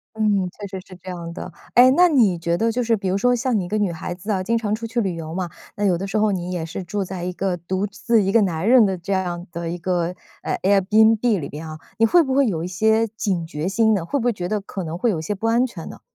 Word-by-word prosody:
嗯， 205 Hz, -4 st, +1 dB
确 205 Hz, -, -9 dB
实 190 Hz, -1 st, -7 dB
是 185 Hz, -, -13 dB
这 185 Hz, -, -12 dB
样 170 Hz, -2 st, -6 dB
的， 175 Hz, +1 st, -7 dB, 0.2 s
哎， 250 Hz, +1 st, +8 dB
那 360 Hz, 0 st, +6 dB
你 225 Hz, -, +3 dB
觉 170 Hz, 0 st, -1 dB
得 225 Hz, +1 st, +1 dB
就 250 Hz, -, 0 dB
是 230 Hz, -1 st, +2 dB
比 195 Hz, -2 st, -3 dB
如 185 Hz, -, +1 dB
说 245 Hz, +5 st, +3 dB
像 250 Hz, -1 st, 0 dB
你 185 Hz, -, -2 dB
一 -, -, -8 dB
个 215 Hz, -, -1 dB
女 205 Hz, -4 st, 0 dB
孩 170 Hz, +1 st, -5 dB
子 185 Hz, +5 st, -7 dB
啊， 190 Hz, -2 st, 0 dB
经 230 Hz, +4 st, +1 dB
常 210 Hz, -2 st, -1 dB
出 230 Hz, +1 st, -5 dB
去 235 Hz, +2 st, -1 dB
旅 190 Hz, -5 st, -1 dB
游 160 Hz, -1 st, -6 dB
嘛， 180 Hz, -2 st, -2 dB, 0.3 s
那 205 Hz, -, -2 dB
有 180 Hz, -3 st, +3 dB
的 190 Hz, -, -4 dB
时 195 Hz, +2 st, -1 dB
候 215 Hz, -1 st, +2 dB
你 180 Hz, -1 st, -3 dB
也 175 Hz, -3 st, -3 dB
是 165 Hz, +3 st, -6 dB
住 195 Hz, +2 st, -3 dB
在 185 Hz, -1 st, -6 dB
一 180 Hz, -, -3 dB
个 185 Hz, 0 st, -2 dB
独 185 Hz, +4 st, -2 dB
自 225 Hz, +3 st, +1 dB
一 195 Hz, -1 st, 0 dB
个 230 Hz, -, +5 dB
男 180 Hz, 0 st, -1 dB
人 245 Hz, -2 st, +7 dB
的 190 Hz, -2 st, -1 dB
这 185 Hz, +4 st, -5 dB
样 180 Hz, -1 st, -2 dB
的 170 Hz, 0 st, -4 dB
一 175 Hz, -, -4 dB
个， 175 Hz, -1 st, 0 dB, 0.4 s
啊 -, -, -2 dB
Airbnb 215 Hz, +3 st, +4 dB
里 140 Hz, -4 st, -5 dB
边 155 Hz, +2 st, -8 dB
啊， 155 Hz, 0 st, -8 dB, 0.2 s
你 225 Hz, -, +5 dB
会 340 Hz, +7 st, +5 dB
不 265 Hz, -1 st, -1 dB
会 275 Hz, -1 st, +4 dB
有 165 Hz, -4 st, -2 dB
一 -, -, -2 dB
些 220 Hz, +5 st, +2 dB
警 200 Hz, -6 st, -2 dB
觉 155 Hz, +1 st, -3 dB
心 220 Hz, +2 st, +3 dB
呢？ 190 Hz, -5 st, -1 dB
会 280 Hz, +12 st, -1 dB
不 245 Hz, -, -3 dB
会 245 Hz, -, +3 dB
觉 180 Hz, -4 st, -5 dB
得 210 Hz, -1 st, -1 dB
可 195 Hz, -1 st, -6 dB
能 165 Hz, 0 st, -5 dB
会 235 Hz, +3 st, +2 dB
有 165 Hz, -, -2 dB
一 -, -, -6 dB
些 165 Hz, -, -3 dB
不 225 Hz, +4 st, -4 dB
安 235 Hz, +2 st, +3 dB
全 200 Hz, -10 st, -6 dB
呢？ -, -, -11 dB
195 Hz, 340 characters per minute, -22 LUFS, 175-220 Hz, 0.4 s, 哎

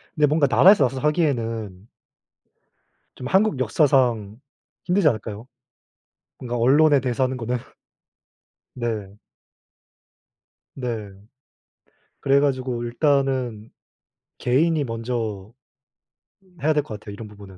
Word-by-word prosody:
근데 150 Hz, -2 st, +3 dB
뭔가 150 Hz, 0 st, +2 dB
나라에서 140 Hz, -, +6 dB
나서서 130 Hz, +1 st, -3 dB
하기에는 115 Hz, -, -2 dB, 1.3 s
좀 125 Hz, -, -7 dB
한국 190 Hz, -2 st, +2 dB
역사상 120 Hz, -5 st, +1 dB, 0.5 s
힘들지 180 Hz, -1 st, +2 dB
않을까요? 110 Hz, -2 st, -2 dB, 0.9 s
뭔가 120 Hz, -1 st, -5 dB
언론에 145 Hz, +5 st, +4 dB
대해서 130 Hz, 0 st, -1 dB
하는 130 Hz, 0 st, -1 dB
거는. 120 Hz, +1 st, -2 dB, 1.2 s
네. 110 Hz, -5 st, -4 dB, 1.6 s
네. 115 Hz, -6 st, -4 dB, 1.1 s
그래 140 Hz, 0 st, +3 dB
가지고 130 Hz, -4 st, -1 dB
일단은 130 Hz, -3 st, 0 dB, 0.7 s
개인이 155 Hz, +6 st, +1 dB
먼저 115 Hz, -4 st, -4 dB, 1.1 s
해야 155 Hz, +2 st, +2 dB
될 150 Hz, -1 st, +1 dB
것 110 Hz, -7 st, -8 dB
같아요, 105 Hz, -1 st, -10 dB
이런 105 Hz, +2 st, -9 dB
부분은. 100 Hz, -2 st, -14 dB
125 Hz, 230 characters per minute, -23 LUFS, 110-140 Hz, 1.6 s, 나라에서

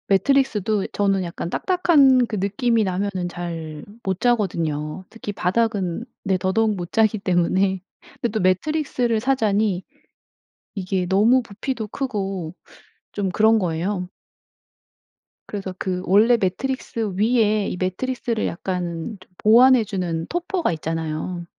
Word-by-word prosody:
매트리스도 215 Hz, -5 st, +1 dB
저는 195 Hz, -2 st, +1 dB
약간 170 Hz, -1 st, -5 dB
딱딱한 280 Hz, -, +4 dB
그 215 Hz, -, -4 dB
느낌이 220 Hz, +4 st, +1 dB
나면은 190 Hz, -1 st, -2 dB
잘 165 Hz, -3 st, -6 dB, 0.2 s
못 190 Hz, -1 st, -2 dB
자거든요. 170 Hz, -8 st, 0 dB
특히 225 Hz, -2 st, -6 dB
바닥은 200 Hz, 0 st, 0 dB, 0.2 s
네 190 Hz, -1 st, +2 dB
더더욱 210 Hz, +4 st, +1 dB
못 175 Hz, -2 st, -6 dB
자기 220 Hz, -1 st, +3 dB
때문에. 190 Hz, 0 st, +1 dB, 0.4 s
근데 240 Hz, -, +1 dB
또 220 Hz, -, -1 dB
매트리스를 240 Hz, -, +1 dB
사자니 215 Hz, -7 st, +1 dB, 0.9 s
이게 185 Hz, -2 st, -2 dB
너무 220 Hz, +7 st, +4 dB
부피도 225 Hz, +1 st, -5 dB
크고 195 Hz, -, -3 dB, 0.6 s
좀 200 Hz, -2 st, -1 dB
그런 220 Hz, +4 st, +4 dB
거예요. 180 Hz, +1 st, -2 dB, 1.4 s
그래서 195 Hz, -3 st, -5 dB
그 180 Hz, -1 st, -2 dB
원래 215 Hz, +6 st, +5 dB
매트리스 225 Hz, +1 st, -2 dB
위에 215 Hz, -1 st, +2 dB
이 -, -, -3 dB
매트리스를 225 Hz, +5 st, -2 dB
약간 175 Hz, +2 st, -4 dB
좀 185 Hz, -, -19 dB
보완해 240 Hz, +2 st, +6 dB
주는 175 Hz, -5 st, -3 dB
topper가 350 Hz, -, -1 dB
있잖아요. 160 Hz, +2 st, -4 dB
200 Hz, 285 characters per minute, -22 LUFS, 180-230 Hz, 1.4 s, 보완해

